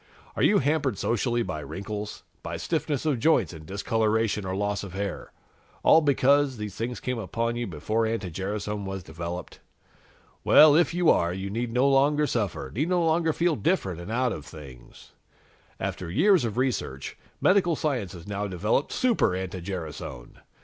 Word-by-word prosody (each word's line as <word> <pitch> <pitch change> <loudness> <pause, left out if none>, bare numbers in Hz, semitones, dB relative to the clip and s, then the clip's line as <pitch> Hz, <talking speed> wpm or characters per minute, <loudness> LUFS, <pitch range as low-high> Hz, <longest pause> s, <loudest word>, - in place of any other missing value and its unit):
Are - - -2
you 210 - +5
hampered 140 - +1
socially 120 +1 0
by 90 -6 -4
wrinkles, 105 +6 -6 0.2
by - - -5
stiffness 145 -1 -2
of 145 -6 +1
joints 120 - +2
and 80 -1 -11
discoloration 110 +1 0
or 95 - -2
loss 100 0 -1
of 95 -3 -8
hair, 100 -1 -4 0.5
all 160 - +7
because 140 -2 +3
these 105 -2 -5
things 115 +2 -4
came 125 -2 -3
upon 115 +3 -2
you 120 0 -3
before 105 +7 -1
anti 110 -5 -3
gerasone 100 +3 -3
was 95 -1 -5
developed? 85 +2 -7 0.8
Well, 150 -1 +7
if 165 -2 +4
you 175 -1 +4
are, 85 0 +2
you 95 +2 -4
need 115 +2 -2
no 125 +3 +3
longer 145 +2 +3
suffer, 105 - -2
need 150 - -1
no 175 -2 +2
longer 165 0 +2
feel 170 +1 +1
different 115 - -1
and 85 - -7
out 125 +1 +1
of 75 - -7
things. 65 -6 -13 0.7
"After 90 - -4
years 170 - +4
of 110 0 -4
research, 120 - -2 0.2
medical 185 -3 +3
science 125 - -2
has 85 -2 -10
now 100 0 -3
developed 105 - 0
Super 245 - +2
anti 95 0 -4
gerasone! 80 -9 -7
110 Hz, 170 wpm, -26 LUFS, 95-140 Hz, 0.8 s, all